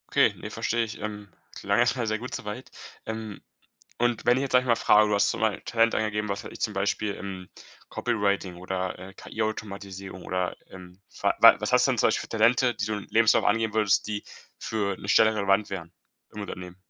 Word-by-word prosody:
Okay, - - +5
ne, - - -8
verstehe 115 0 -1
ich. 110 - -7
Ähm. 105 -1 -6 0.3
Klang 100 +1 0
erstmal 120 0 +2
sehr 110 0 0
gut 125 - -7
so - - -7
weit. 105 +5 -6 0.4
Ähm, 110 -2 -6 0.6
und 120 -1 0
wenn 120 +1 +4
ich 135 - 0
jetzt, 135 - -3
sage 125 0 +5
ich - - -9
mal, 115 - +4
frage, 105 0 +5
du 105 - +1
hast 100 - +3
zum 115 - -4
bei 110 -3 +1
Talent 115 0 +2
angegeben, 105 -1 -1
was 100 - -3
weiß - - -8
ich, - - -11
zum 105 - -1
Beispiel, 100 +1 -1
hm, 95 -1 -7 0.4
Copywriting 100 -6 -1
oder, 95 0 -3
äh, 95 +1 -11
KI-Automatisierung 100 -3 -5
oder, 90 -1 -2
ähm 90 0 -13 0.2
wa - - +3
wa - - +9
was - - -2
hast - - +5
du - - +2
denn - - -3
zum - - +4
Beispiel - - 0
für - - -10
Talente, 120 +2 +4
die 105 - -2
du 110 - -1
im 105 - -6
Lebenslauf 115 0 +4
angeben 110 0 +1
würdest, 105 -2 +2
die 105 -1 -3 0.4
für 100 -3 -2
'ne 100 - -9
Stelle 110 +1 +5
relevant 100 0 +1
wären 85 -3 -6 0.4
im 105 - -7
Unternehmen? 90 -2 -8
105 Hz, 220 wpm, -26 LUFS, 100-110 Hz, 0.6 s, wa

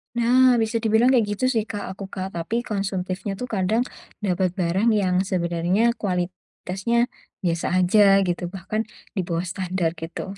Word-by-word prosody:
Nah 250 +2 +5
bisa 225 +1 0
dibilang 225 +3 +3
kayak 240 -4 +4
gitu 230 - -7
sih 225 -4 +1
Kak, 205 -5 -5
aku 195 +1 -7
Kak. 190 0 -5
Tapi 215 +8 -2
konsumtifnya 195 -2 -3
tuh 250 +5 -5
kadang 205 +5 +2 0.4
dapet 185 -1 +1
barang 190 +5 +1
yang 185 -3 +1
sebenarnya, 180 +4 +1
kualitasnya 185 +3 -3 0.5
biasa 170 -2 0
aja 185 +4 +4 0.3
gitu, 175 0 -2
bahkan 195 +4 -3 0.3
di 190 - +1
bawah 170 0 -1
standar, 180 -2 -2
gitu. 170 +4 -6
195 Hz, 150 wpm, -23 LUFS, 180-220 Hz, 0.5 s, Nah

